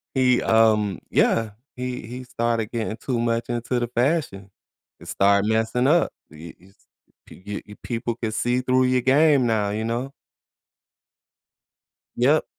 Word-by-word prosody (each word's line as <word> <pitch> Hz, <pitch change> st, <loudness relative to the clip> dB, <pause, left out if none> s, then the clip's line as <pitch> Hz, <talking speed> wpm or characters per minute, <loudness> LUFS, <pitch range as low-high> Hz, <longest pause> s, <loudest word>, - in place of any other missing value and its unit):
he, 125 Hz, -1 st, +3 dB
um, 105 Hz, -4 st, +3 dB
yeah. 115 Hz, -2 st, +2 dB, 0.3 s
He 125 Hz, -2 st, -5 dB
he 125 Hz, +2 st, -7 dB
started 115 Hz, -2 st, -2 dB
getting 110 Hz, -2 st, -3 dB
too 120 Hz, +1 st, -3 dB
much 115 Hz, 0 st, -1 dB
into 120 Hz, +1 st, -2 dB
the 120 Hz, -, -2 dB
fashion, 120 Hz, -, -1 dB, 0.5 s
and -, -, -14 dB
started 100 Hz, +1 st, +2 dB
messing 115 Hz, +3 st, +1 dB
up. 170 Hz, +4 st, +3 dB, 0.2 s
Y 80 Hz, +2 st, -11 dB
yes, 95 Hz, +2 st, -21 dB, 0.5 s
p -, -, -15 dB
g 105 Hz, +1 st, -5 dB
p 105 Hz, -, -13 dB
people 115 Hz, -1 st, -3 dB
can 115 Hz, -2 st, -4 dB
see 120 Hz, +3 st, 0 dB
through 130 Hz, 0 st, +2 dB
your 125 Hz, 0 st, +2 dB
game 140 Hz, +1 st, +4 dB
now, 105 Hz, -3 st, 0 dB
you 110 Hz, +2 st, -3 dB
know? 120 Hz, +4 st, -3 dB, 2.0 s
Yep. 140 Hz, +6 st, +3 dB
120 Hz, 150 wpm, -23 LUFS, 110-125 Hz, 2.0 s, game